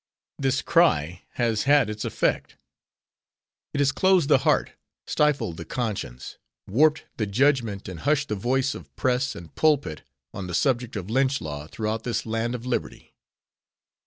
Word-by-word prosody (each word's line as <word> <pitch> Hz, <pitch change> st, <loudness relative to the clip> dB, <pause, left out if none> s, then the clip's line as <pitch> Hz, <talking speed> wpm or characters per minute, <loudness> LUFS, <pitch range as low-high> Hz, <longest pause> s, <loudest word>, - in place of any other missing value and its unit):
This 135 Hz, -1 st, +1 dB
cry 90 Hz, -, +2 dB
has 115 Hz, -2 st, 0 dB
had 140 Hz, -4 st, +5 dB
its 105 Hz, 0 st, -5 dB
effect. -, -, -1 dB, 1.2 s
It -, -, -3 dB
has 145 Hz, 0 st, +3 dB
closed 185 Hz, -5 st, +3 dB
the 140 Hz, -, +6 dB
heart, -, -, +2 dB, 0.3 s
stifled 145 Hz, -, +1 dB
the 85 Hz, -, -6 dB
conscience, 100 Hz, -, -4 dB, 0.3 s
warped 150 Hz, +9 st, +3 dB
the 110 Hz, -, -1 dB
judgment 115 Hz, -3 st, +1 dB
and 90 Hz, -3 st, -7 dB
hushed 145 Hz, -, +1 dB
the 105 Hz, -, 0 dB
voice 130 Hz, +6 st, 0 dB
of -, -, -12 dB
press 130 Hz, +1 st, 0 dB
and 85 Hz, -1 st, -11 dB
pulpit 145 Hz, -, +1 dB, 0.3 s
on 95 Hz, -2 st, -5 dB
the 90 Hz, -, -3 dB
subject 125 Hz, -4 st, +1 dB
of 100 Hz, 0 st, -5 dB
lynch 135 Hz, +2 st, +2 dB
law 75 Hz, -1 st, -6 dB
throughout 110 Hz, +5 st, -3 dB
this 115 Hz, -4 st, -2 dB
"land 115 Hz, +2 st, -1 dB
of 120 Hz, 0 st, -7 dB
liberty." 125 Hz, -, -4 dB
120 Hz, 155 wpm, -25 LUFS, 100-140 Hz, 1.2 s, the